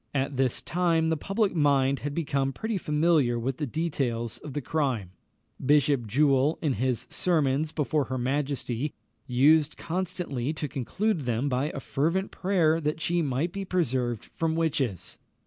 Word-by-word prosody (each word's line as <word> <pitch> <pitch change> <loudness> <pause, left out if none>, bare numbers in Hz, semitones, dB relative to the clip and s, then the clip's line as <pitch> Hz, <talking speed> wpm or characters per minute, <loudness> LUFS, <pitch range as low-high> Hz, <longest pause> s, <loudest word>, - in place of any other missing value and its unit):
At 140 +1 0
this 130 -2 0
time 165 -2 +1
the 160 - +2
public 195 +6 0
mind 140 -4 +3
had 145 +1 -4
become 140 -4 0
pretty 220 +2 -2
familiar 150 -6 +2
with 125 +3 -2
the 150 - -2
details 125 -6 -2
of 145 - -8
the 145 - -1
crime. 130 - -1 0.5
Bishop 140 -3 +3
Jewell, 140 +4 +3
in 150 -5 0
his 125 +2 -1
sermons 155 -3 +1
before 150 -2 0
her 130 - -3
majesty, 135 0 -2 0.3
used 150 +4 +4
constantly 165 -6 -2
to 155 -1 -3
conclude 160 - -1
them 120 +3 0
by 130 +1 0
a - - -5
fervent 165 +9 -1
prayer 170 -4 +2
that 150 +1 -1
she 175 +2 +1
might 145 +3 -1
be 195 +2 -4
preserved 130 - -1
from 160 -1 0
witches. 140 - -1
145 Hz, 155 wpm, -27 LUFS, 130-165 Hz, 0.5 s, used